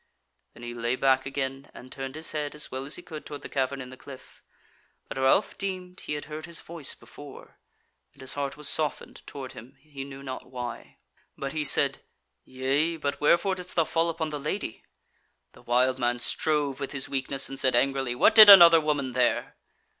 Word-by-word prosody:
Then 120 - -13
he 120 0 -6
lay 120 +1 -1
back 130 0 +2
again, 135 0 -4
and 130 +1 -12
turned 135 0 -6
his 155 +1 -4
head 150 -1 -4
as 150 - -5
well 130 +1 -5
as 145 - -3
he 175 - -9
could 160 -4 -9
toward 145 -1 -9
the - - -6
cavern 135 0 -2
in 130 -1 -8
the - - -10
cliff. 130 -1 -14 0.7
But - - -6
Ralph 135 +10 +2
deemed 185 -2 -5
he - - -5
had 150 - -5
heard 155 +1 -8
his 170 -1 -3
voice 165 -4 -4
before, 145 -2 -14 0.5
and - - -18
his 130 -1 -6
heart 140 0 -4
was 150 -1 -2
softened 150 -1 -1
toward 135 -3 -8
him, 130 +5 -13
he 140 -1 -9
knew 135 0 -10
not 130 -1 -7
why; 125 -2 -7 0.4
but 135 0 -5
he 155 -1 -1
said: 135 - +3 0.4
"Yea, 140 +6 -1
but 145 -2 -3
wherefore 170 +6 +3
didst 180 -1 -5
thou 165 - +3
fall 165 +1 0
upon 160 -1 -3
the 150 - -4
Lady?" 150 - -4 0.7
The - - -17
wild 125 +2 +1
man 120 0 0
strove 140 +2 -1
with 140 0 -5
his 140 -2 -2
weakness, 135 0 0
and 135 - -4
said 130 -2 +3
angrily: 135 -1 +1
"What - - +4
did 215 -2 +10
another 170 -4 +10
woman 145 -4 -1
there?" 125 -1 0
140 Hz, 200 wpm, -27 LUFS, 130-155 Hz, 0.7 s, did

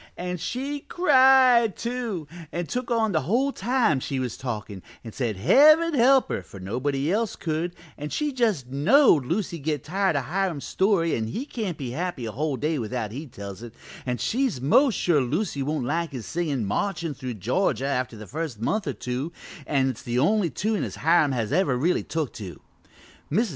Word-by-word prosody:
And 180 0 -4
she 270 - -3
cried, 260 - +5
too, 235 -9 -3 0.2
and 175 -1 -3
took 250 0 -3
on 225 -3 +1
the 155 -4 +1
whole 240 - +1
time 225 - +1
she 135 +1 -3
was 125 -3 -2
talkin' 105 -6 -5 0.2
an' 115 - -8
said 115 -4 -2
Heaven 310 - +6
help 265 0 +5
her, - - -2
for 100 - -12
nobody 135 - -1
else 220 +1 0
could, 165 +1 -3 0.2
an' 150 +1 -4
she 300 - -1
just 225 - 0
knowed 145 - +4
Lucy'd 170 -2 -2
get 150 -3 -1
tired 190 +1 0
o' 140 - +1
Hiram's 175 -1 -2
story 190 -4 +1
an' 110 -1 -2
he 235 - -4
can't 210 - -4
be 130 -4 -5
happy 165 -3 -3
a 110 - -4
whole 145 +3 -2
day 155 +1 -1
without 115 -2 -3
he 145 +7 -6
tells 100 -5 -9
it, 120 -1 -10 0.3
an' 125 -1 -2
she's 250 - 0
most 215 - +4
sure 160 -5 +2
Lucy 145 - -1
won't 145 -1 -1
like 165 +5 -1
his 120 -5 -6
singin' 150 -9 -2
'Marchin' 165 - -2
Through 125 -2 -6
Georgia' 125 - 0
after 125 -4 -2
the 110 - -9
first 145 - -5
month 200 - -1
or 140 - -1
two, 125 +7 -4 0.4
an' 135 -3 +2
it's 130 -4 -4
the 120 0 -3
only 190 +6 +2
tune 215 +5 -1
as - - -5
Hiram 160 -2 +3
has 115 -4 -2
ever 160 -10 +2
really 165 +8 +1
took 155 -3 -3
to. 95 -9 -8 0.7
Mrs. 220 +8 +2
155 Hz, 190 wpm, -25 LUFS, 125-215 Hz, 0.7 s, Heaven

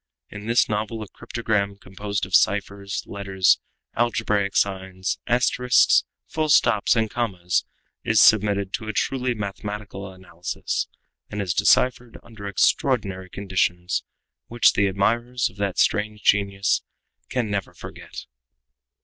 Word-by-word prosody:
In 105 +1 -8
this 120 +1 +3
novel 110 +1 -3
a - - -10
cryptogram, 105 -3 -2
composed 100 +1 -4
of 95 - 0
ciphers, 100 0 +1
letters, 95 -2 +1 0.4
algebraic 105 -4 0
signs, 95 -1 -1
asterisks, 125 0 +3 0.2
full 155 -1 -2
stops, 120 -7 +4
and 110 -1 +2
commas, 95 -7 -1 0.4
is - - +3
submitted 100 -2 +4
to 110 - -4
a 110 - -3
truly 125 +2 -1
mathematical 100 -1 -6
analysis, 90 -2 -4 0.4
and 105 - -5
is 95 -4 -1
deciphered 125 +5 +2
under 110 -3 -10
extraordinary 100 -2 +1
conditions, 95 -2 -1 0.4
which 120 0 +4
the 100 - +2
admirers 120 +6 0
of 95 - -22
that 100 -2 -2
strange 105 -1 +1
genius 100 0 +2 0.5
can 120 -5 -1
never 100 -2 -2
forget. - - -10
100 Hz, 125 wpm, -23 LUFS, 95-115 Hz, 0.5 s, stops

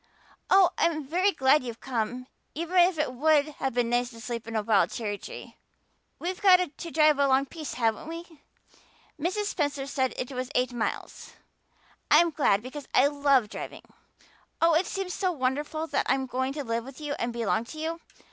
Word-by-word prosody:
Oh, 380 -2 +6
I'm 320 -2 +1
very 365 +8 +2
glad 270 -2 +3
you've 235 -2 -7
come, 245 0 -3 0.3
even 335 +4 -4
if 355 -1 +5
it 300 -4 -1
would 300 +2 +3
have 265 -3 -1
been 240 -1 +1
nice 245 0 +1
to 230 -2 -13
sleep 230 -1 -5
in 230 - -6
a 215 - 0
wild 205 -2 +3
cherry 205 -3 -4
tree. - - -10 0.6
We've 365 +2 -4
got 365 -6 +5
to 340 - -7
drive 305 -2 +4
a 280 - +4
long 270 +1 +3
piece, 310 0 -7
haven't 225 +2 0
we? 335 +1 -6 0.9
Mrs. 370 +7 -1
Spencer 290 -8 -2
said 260 -2 -1
it 255 - -4
was 255 -1 -4
eight 250 0 +1
miles. 235 -2 -4 0.8
I'm 330 +3 +6
glad 220 -9 +2
because 270 +3 -8
I 260 - +6
love 280 -5 +3
driving. - - -7 0.8
Oh, 330 0 +4
it 330 +4 +2
seems 385 -2 -3
so 370 -2 0
wonderful 295 +2 -2
that - - -1
I'm 265 0 +2
going 260 +1 -2
to 290 0 -4
live 230 -1 -2
with 265 +3 -11
you 295 -1 -3
and 235 - -1
belong 230 -1 -1
to 310 - -10
you. 325 +2 -3
280 Hz, 190 wpm, -27 LUFS, 245-325 Hz, 0.9 s, Oh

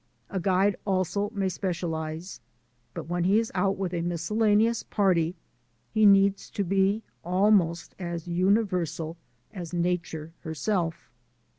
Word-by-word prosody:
A 190 - -1
guide 190 +2 +2
also 195 +1 0
may 200 -3 -1
specialize, 170 -2 -3 0.6
but - - -4
when 175 0 -1
he 195 +4 +4
is 225 0 0
out 195 +1 +1
with 185 -2 -3
a 170 - -1
miscellaneous 210 +6 +2
party 180 -4 +1 0.6
he 215 -1 +5
needs 200 0 +4
to 200 - -2
be 195 +3 +1 0.2
almost 180 -2 +2
as 170 -2 -5
universal 180 -3 0 0.4
as 175 -4 -6
Nature 170 -2 -2
herself. 165 +2 -2
185 Hz, 125 wpm, -27 LUFS, 170-200 Hz, 0.6 s, he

